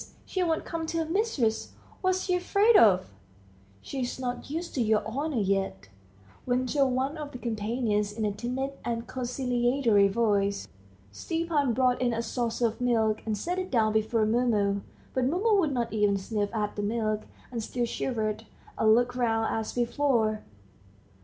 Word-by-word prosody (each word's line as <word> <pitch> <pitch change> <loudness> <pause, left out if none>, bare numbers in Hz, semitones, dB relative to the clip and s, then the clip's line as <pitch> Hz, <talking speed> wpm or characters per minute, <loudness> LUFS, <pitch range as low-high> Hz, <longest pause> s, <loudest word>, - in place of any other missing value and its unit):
she 375 - -2
won't 330 -3 0
come 330 -1 -4
to 330 - -2
her 325 - 0
mistress. 315 - 0 0.3
What's 370 0 +1
she 365 - 0
afraid 400 +5 +3
of?" 185 - +5 0.7
"She's 260 -2 -4
not 250 0 -4
used 335 +4 -4
to 260 - 0
your 215 -2 +2
honor 280 +5 -2
yet," 195 - -1 0.6
ventured 255 +3 +2
one 260 +4 -1
of 295 -2 -6
the 250 - -7
companions 220 -2 -1
in 215 +1 -3
a 205 - +1
timid 250 +6 -3
and 230 0 -2
conciliatory 245 -3 +2
voice. 200 -2 +1 0.4
Stepan 310 - -1
brought 250 +1 +2
in 245 -2 +2
a 230 - -1
saucer 235 0 -1
of 230 +2 -2
milk, 225 -3 +2
and 215 -1 0
set 355 - -2
it 370 - -4
down 220 -4 +2
before 220 +1 +2
Mumu, 215 -4 +1 0.3
but 260 -1 +1
Mumu 400 +8 +2
would 315 -6 +2
not 240 -4 -2
even 205 -2 +2
sniff 205 +1 -2
at 210 -2 -2
the 205 - -2
milk, 215 0 -1 0.2
and 235 -2 -3
still 240 +2 -2
shivered, 220 -3 -2 0.3
and 220 0 +6
looked 245 +1 +1
round 225 -3 +1
as 220 -1 -2
before. 240 -3 +1
240 Hz, 165 wpm, -28 LUFS, 215-275 Hz, 0.7 s, and